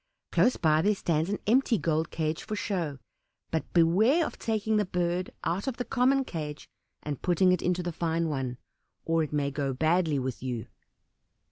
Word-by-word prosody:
Close 250 - +3
by, 155 -1 +3
there 205 +4 +2
stands 165 -2 0
an 205 - 0
empty 240 +1 +3
gold 160 -2 0
cage 160 0 -2
for 215 - -4
show, 175 -9 -2 0.5
but 160 -3 -2
beware 210 - +4
of - - -7
taking 220 -1 0
the 210 - +2
bird 180 0 -1
out 185 +7 -1
of 255 -3 -2
the 245 - -3
common 265 +2 +2
cage 150 -6 -6 0.4
and 145 -3 -4
putting 180 +1 +3
it 180 - +1
into 180 0 0
the 175 - -2
fine 165 0 0
one, 135 -5 -3 0.5
or 165 0 +2
it 155 - -2
may 145 -2 0
go 140 -1 -2
badly 160 +2 +2
with 130 -2 -3
you." 120 -3 -3
170 Hz, 180 wpm, -28 LUFS, 155-205 Hz, 0.5 s, beware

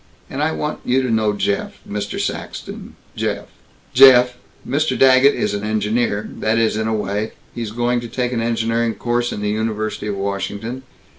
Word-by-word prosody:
And 135 - -3
I 155 +1 +2
want 150 -1 -3
you 130 +2 +2
to 125 - -1
know 110 -2 +2
Jeff 100 0 -1
Mr. 105 0 -4
Saxton.... - - -5 0.2
Jeff, - - -2 1.2
Mr. 155 +4 0
Daggett 135 +1 +6
is 105 - -1
an 100 0 -3
engineer, 110 0 0
that 110 +1 +1
is, 115 -1 +2
in 110 0 -1
a 110 - 0
way. 105 +1 -2 0.2
He's 115 -2 -4
going 120 +2 0
to 120 - -6
take 125 +1 -2
an 115 - 0
engineering 115 0 0
course 120 0 -1
in 105 - -4
the 105 - -1
University 110 -1 -2
of 105 - -2
Washington. 100 +5 -3
110 Hz, 170 wpm, -20 LUFS, 105-120 Hz, 1.2 s, Daggett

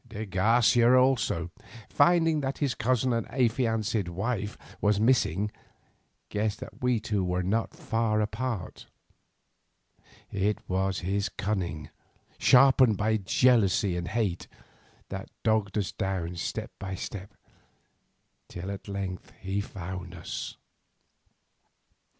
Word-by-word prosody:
De 110 -1 -5
Garcia 115 +5 +4
also, 115 -10 +2 0.4
finding 165 +1 +3
that 135 0 -2
his 140 -4 0
cousin 125 +1 +1
and 115 -2 -1
affianced 115 -5 0
wife 105 +3 -3 0.2
was 105 -1 +3
missing, 105 -4 +2 0.8
guessed 105 0 -1
that - - -10
we 125 -2 +2
two 105 -2 -1
were 90 0 0
not 110 - -1
far 115 -9 0
apart. 105 -1 -3 1.4
It 100 +2 0
was 95 +1 0
his 100 +3 -1
cunning, 90 -8 -3 0.5
sharpened 130 -4 +6
by 110 +2 +2
jealousy 100 -2 +3
and 85 0 -3
hate, 100 -3 -1 0.6
that - - -6
dogged 110 -2 +1
us 100 -3 -1
down 95 -4 -3
step 85 - -4
by 95 -1 -4
step 95 +1 -7 1.1
till 90 +3 -6
at 100 +1 -8
length 100 -2 -5
he 95 +2 -2
found 90 -2 -7
us. 85 - -6
105 Hz, 115 wpm, -28 LUFS, 95-120 Hz, 1.4 s, sharpened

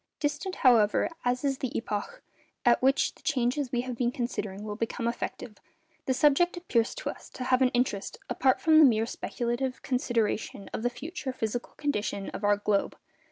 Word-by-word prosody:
Distant, 295 +5 -2
however, 225 -5 +4
as 250 +2 0
is 275 -1 0
the 260 - -2
epoch 350 - -4 0.4
at 240 -1 +5
which 270 +2 +3
the - - -22
changes 260 -1 0
we 245 - +1
have 250 -1 -5
been 240 0 0
considering 210 -5 -4
will 210 -1 -4
become 230 +1 -2
effective, 235 -2 -4 0.5
the 260 - +3
subject 300 +6 +3
appears 240 -10 0
to - - -3
us - - -13
to 255 - -6
have 255 0 +2
an 255 - +5
interest 245 -5 -1
apart 260 -1 +2
from 315 -1 +5
the 310 - +9
mere 225 -4 +3
speculative 240 +2 -3
consideration 230 -5 -1
of - - -3
the 245 - +1
future 300 +1 -5
physical 240 -1 -4
condition 210 -9 -2
of - - -7
our 205 0 +4
globe. 205 -1 0
245 Hz, 180 wpm, -28 LUFS, 225-275 Hz, 0.5 s, the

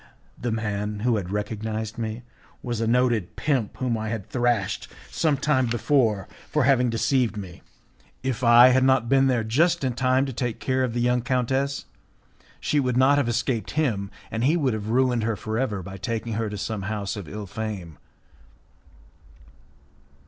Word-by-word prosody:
The 120 - -3
man 105 -1 -2
who 120 -1 +2
had 90 -4 -4
recognized 110 +2 -3
me 110 +1 -4 0.4
was 120 -3 -3
a 115 - 0
noted 120 -5 +1
pimp 135 -8 -1
whom 120 -3 -1
I 110 0 -3
had 110 -4 -4
thrashed 115 -5 0 0.2
some 155 -4 +1
time 130 -3 +2
before 115 -4 +1 0.2
for 150 - +1
having 125 -2 +3
deceived 115 0 +1
me. 95 -4 -8 0.6
If 130 -2 -2
I 120 +1 +8
had 130 +1 +4
not 130 -3 +3
been 135 0 +4
there 125 -4 +1
just 160 +9 +2
in 130 -2 0
time 130 +2 +2
to 135 - -5
take 120 -1 -3
care 130 0 0
of 120 -2 -2
the 120 - 0
young 125 0 +2
countess, 130 +3 -1 0.7
she 150 - +1
would 125 -3 0
not 135 +2 +5
have 120 - 0
escaped 115 -2 -1
him, 110 -11 0 0.2
and 110 +1 -2
he 150 +6 +3
would 135 -7 +1
have 105 -1 -4
ruined 125 0 +2
her 110 0 0
for 110 +2 -3
ever 105 -8 -1
by 95 +2 -8
taking 115 +3 -3
her 110 0 -1
to 105 - -5
some 105 0 -3
house 100 +1 -3
of 100 -8 -7
ill 105 0 -6
fame. 100 -6 -6
115 Hz, 180 wpm, -25 LUFS, 110-130 Hz, 0.7 s, I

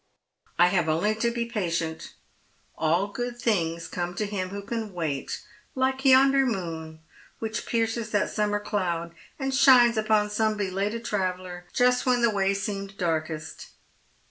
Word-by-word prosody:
I 175 +1 +6
have 175 -4 +1
only 170 +7 +2
to 225 +2 0
be 235 0 -2
patient. 170 -8 -3 0.6
All 165 +4 +1
good 240 +4 -4
things 170 -8 0
come 175 0 -4
to 210 - -1
him 195 -3 -3
who 200 +1 -6
can 220 -1 -4
wait, 155 -6 -3 0.3
hke 265 +1 0
yonder 270 +1 +6
moon 165 -9 -4 0.4
which 225 0 -4
pierces 230 -1 -1
that 205 -1 0
summer 210 -1 0
cloud, 175 -5 -2 0.2
and 270 -1 -2
shines 250 -4 +6
upon 215 -1 +2
some 215 0 +1
belated 205 +4 -2
traveller, 185 -3 -3
just 250 +1 +2
when 245 -1 +3
the 235 - +4
way 195 -1 +1
seemed 195 -1 -4
darkest.' 155 -3 -3
205 Hz, 145 wpm, -26 LUFS, 175-230 Hz, 0.6 s, I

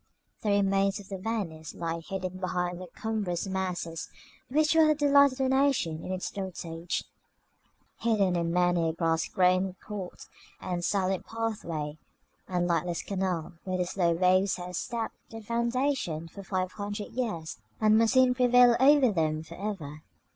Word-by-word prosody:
The 215 - -1
remains 195 0 +2
of 195 - -12
their 195 -2 -5
Venice 185 -7 -4
lie 165 0 -3
hidden 185 +2 -5
behind 180 -1 -2
the 185 - -7
cumbrous 205 -3 -3
masses 185 -4 -3 0.4
which 305 +4 +3
were 320 -1 +6
the 305 - +4
delight 280 -1 +5
of - - -11
the 265 -1 +1
nation 265 - +1
in - - -5
its 185 0 -3
dotage; 170 -3 -4 1.0
hidden 205 -6 +2
in 170 -1 0
many 175 -1 +2
a - - -2
grass 165 -1 0
grown 185 0 +2
court, 195 -3 -8 0.3
and 175 -1 -3
silent 190 0 0
pathway, 170 -10 -3 0.5
and 180 -1 0
lightless 170 0 0
canal, 185 -4 -2
where 185 -1 -2
the 180 - 0
slow 175 -1 +1
waves 185 +3 +3
have 180 0 -7
sapped 230 +5 -3
their 225 -1 -9
foundations 235 - -1
for 200 - -9
five 185 -1 -2
hundred 205 0 -5
years, 210 - -3 0.2
and 215 0 +5
must 225 -1 +3
soon 260 -1 +5
prevail 245 -1 +6
over 270 -2 +6
them 155 -4 0
for 165 - -11
ever. 170 -7 -5
190 Hz, 160 wpm, -29 LUFS, 175-225 Hz, 1.0 s, were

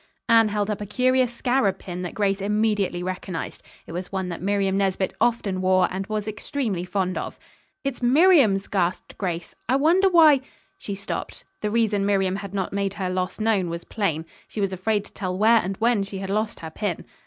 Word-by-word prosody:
Anne 230 -1 +6
held 205 -1 -1
up 210 - -4
a - - -3
curious 255 +3 +2
scarab 240 -5 +1
pin 180 -1 -6
that 180 +2 -5
Grace 200 -2 +1
immediately 205 -3 0
recognized. 185 -1 -5 0.2
It - - -10
was 180 +2 -5
one 190 -2 -2
that 170 - -5
Miriam 195 0 +1
Nesbit 195 -1 0
often 205 -6 +1
wore, 185 -1 +4
and 190 +1 -4
was 215 -1 -3
extremely 215 -3 -3
fond 185 0 -1
of. - - -6 0.5
"It's 275 -2 -3
Miriam's," 255 - +5
gasped 180 -2 -1
Grace. 175 -3 -3 0.2
"I 255 - +4
wonder 340 +8 +4
why 315 -6 +6 0.2
" - - -38
She 200 - -5
stopped. 195 - -5 0.2
The 210 - 0
reason 215 -2 +1
Miriam 195 -1 +1
had 200 -1 -7
not 190 -1 -2
made 200 0 -1
her 185 -3 -2
loss 185 +2 -2
known 215 -5 +1
was 170 0 -5
plain. 165 -7 -2 0.2
She - - -7
was 195 -2 0
afraid 205 +2 0
to - - -17
tell 185 -2 -3
where 225 +3 +5
and 195 -2 -1
when 230 -2 +2
she 195 0 -5
had 195 0 -4
lost 215 +1 -1
her 160 -1 -7
pin. 195 -1 -3
200 Hz, 200 wpm, -24 LUFS, 185-225 Hz, 0.5 s, Anne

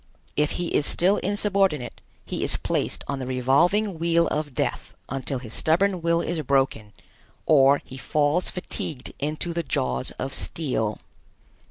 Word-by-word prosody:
If 150 0 +1
he 175 -1 -2
is 145 - +2
still 190 +4 +3
insubordinate, 195 - 0 0.2
he - - -3
is - - +3
placed - - -1
on 140 -1 -2
the 130 - -4
revolving 165 - +2
wheel 170 0 +3
of 150 -3 -3
death - - -2
until 135 0 -3
his 120 -3 -7
stubborn 180 +3 +2
will 170 0 +2
is 170 -1 -2
broken, 135 -6 0 0.5
or 140 -2 +5
he 130 - -10
falls 150 +5 +1
fatigued 155 -6 -5
into 155 +4 -2
the 170 - -1
jaws 65 - -1
of 135 +1 -3
steel. 125 -9 -1
150 Hz, 150 wpm, -25 LUFS, 135-170 Hz, 0.5 s, or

